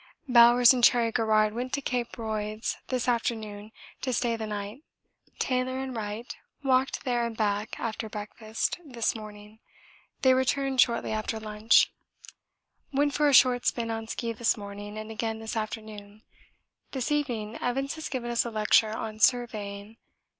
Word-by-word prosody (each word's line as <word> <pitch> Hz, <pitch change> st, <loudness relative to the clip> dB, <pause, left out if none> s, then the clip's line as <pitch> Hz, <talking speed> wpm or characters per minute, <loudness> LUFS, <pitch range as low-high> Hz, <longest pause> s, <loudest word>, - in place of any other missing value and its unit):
Bowers 240 Hz, 0 st, +7 dB
and 250 Hz, -2 st, -1 dB
Cherry 235 Hz, -1 st, +5 dB
Garrard 215 Hz, -2 st, +2 dB
went 250 Hz, +3 st, -4 dB
to 280 Hz, -, +1 dB
Cape 245 Hz, -3 st, -2 dB
Royds 215 Hz, -1 st, -3 dB
this 255 Hz, -2 st, -2 dB
afternoon 220 Hz, -3 st, -2 dB, 0.3 s
to 260 Hz, -, -1 dB
stay 235 Hz, -1 st, 0 dB
the 220 Hz, -1 st, -5 dB
night. 210 Hz, +4 st, -5 dB, 0.6 s
Taylor 255 Hz, 0 st, -1 dB
and 265 Hz, -1 st, -4 dB
Wright 215 Hz, +2 st, -5 dB, 0.3 s
walked 265 Hz, 0 st, +1 dB
there 240 Hz, -2 st, +1 dB
and 230 Hz, -1 st, -4 dB
back 210 Hz, 0 st, -1 dB
after 225 Hz, -1 st, -4 dB
breakfast 215 Hz, +6 st, -3 dB
this 240 Hz, -7 st, -1 dB
morning. 210 Hz, 0 st, -10 dB, 0.6 s
They 260 Hz, -1 st, +6 dB
returned 260 Hz, 0 st, +2 dB
shortly 235 Hz, -2 st, +1 dB
after 220 Hz, +1 st, -2 dB
lunch. 215 Hz, +1 st, +3 dB, 1.0 s
Went 285 Hz, +1 st, +1 dB
for 295 Hz, 0 st, +3 dB
a -, -, +2 dB
short 245 Hz, -1 st, +5 dB
spin 230 Hz, -1 st, 0 dB
on 225 Hz, 0 st, -4 dB
ski 230 Hz, 0 st, -3 dB
this 230 Hz, +1 st, +1 dB
morning 205 Hz, 0 st, -8 dB
and 215 Hz, +1 st, -6 dB
again 225 Hz, 0 st, -3 dB
this 220 Hz, 0 st, -6 dB
afternoon. 215 Hz, -1 st, -6 dB, 0.7 s
This 265 Hz, 0 st, -2 dB
evening 240 Hz, -7 st, -1 dB
Evans 270 Hz, +3 st, -1 dB
has 315 Hz, -1 st, -6 dB
given 240 Hz, -3 st, -3 dB
us 235 Hz, -, +2 dB
a 235 Hz, -, -4 dB
lecture 215 Hz, 0 st, +3 dB
on 215 Hz, -1 st, -5 dB
surveying. 215 Hz, -3 st, 0 dB
230 Hz, 155 wpm, -28 LUFS, 215-250 Hz, 1.0 s, Bowers